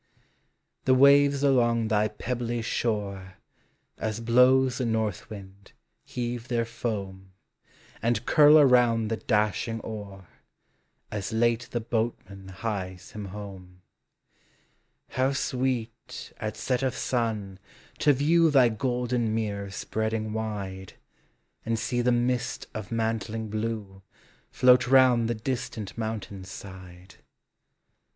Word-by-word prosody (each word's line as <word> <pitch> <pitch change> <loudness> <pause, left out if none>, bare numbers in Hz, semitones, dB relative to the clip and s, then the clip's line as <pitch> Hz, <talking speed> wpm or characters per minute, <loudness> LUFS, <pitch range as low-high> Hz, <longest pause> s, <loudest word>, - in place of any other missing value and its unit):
The 130 - +5
waves 140 +1 +5
along 120 -5 +3
thy 105 -1 +2
pebbly 120 +2 -3
shore, 100 -5 -2 0.6
As 110 0 -2
blows 125 +2 +4
the 125 - 0
north 110 0 -2
wind, 100 -2 -11 0.3
heave 120 -1 -4
their 120 -2 0 0.2
loam, 95 -4 -4 0.7
And 115 0 0
curl 150 -1 +7
around 120 -6 +4
the 115 - -1
dashing 110 +1 0
oar, 100 -4 -8 0.8
As 105 +1 -4
late 115 +1 +1
the 120 - -2
boatman 110 -4 -3
hies 95 -2 -5
him 105 -1 -7
home. 95 -2 -10 1.3
How 130 +2 +1
sweet, 130 -3 -3
at 110 0 -4
set 125 +2 -1
of 130 -2 -1
sun, 110 -6 -2 0.4
to 150 - +5
view 160 +5 +4
Thy 135 -5 +5
golden 120 -1 -1
mirror 100 -3 -3
spreading 110 +2 -3
wide, 100 -4 -5 0.7
And 115 0 -1
see 120 +2 -1
the 125 +1 +2
mist 125 +1 0
of 110 -2 -7
mantling 110 -1 -2
blue 110 -3 -4 0.5
Float 125 -1 +5
round 125 -3 +5
the 120 - 0
distant 110 -3 -4
mountain's 110 -4 -5
side. 95 -1 -11
115 Hz, 115 wpm, -27 LUFS, 105-125 Hz, 1.3 s, curl